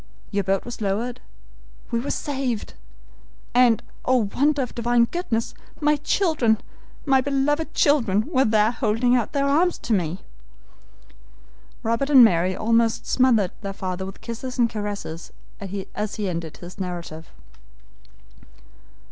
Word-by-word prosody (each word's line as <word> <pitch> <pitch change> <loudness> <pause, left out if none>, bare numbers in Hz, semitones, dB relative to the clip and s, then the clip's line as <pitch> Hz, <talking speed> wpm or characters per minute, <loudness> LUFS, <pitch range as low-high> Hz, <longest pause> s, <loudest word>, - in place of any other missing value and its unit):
Your 200 -1 0
boat 195 +1 0
was 240 -1 -7
lowered 225 +5 -2 0.7
we 235 - +1
were 255 - -4
saved 265 -6 -3 0.8
and, 240 -3 +4 0.2
oh, 250 -5 +2
wonder 285 0 +2
of 250 - -7
Divine 235 0 +2
goodness, 235 -7 -2 0.3
my 300 0 +3
children, 295 - +2 0.5
my 270 -2 +4
beloved 285 +3 0
children, 230 -9 +3
were 270 -3 +2
there 215 0 +3
holding 245 +1 +1
out 240 -4 -1
their 280 -1 +1
arms 330 +6 +2
to 235 - -2
me!" 180 -2 -1 1.6
Robert 230 +5 0
and 265 -4 +9
Mary 185 -3 +3
almost 230 +1 +1
smothered 230 -8 +3
their 195 -2 -5
father 190 -1 -4
with 195 - -10
kisses 245 +2 -6
and 235 -2 +2
caresses 205 -6 -5 0.3
as 200 +1 -5
he 210 -2 -2
ended 170 -3 -4
his 175 +2 -11
narrative. 170 -3 -6
230 Hz, 130 wpm, -23 LUFS, 200-260 Hz, 1.6 s, and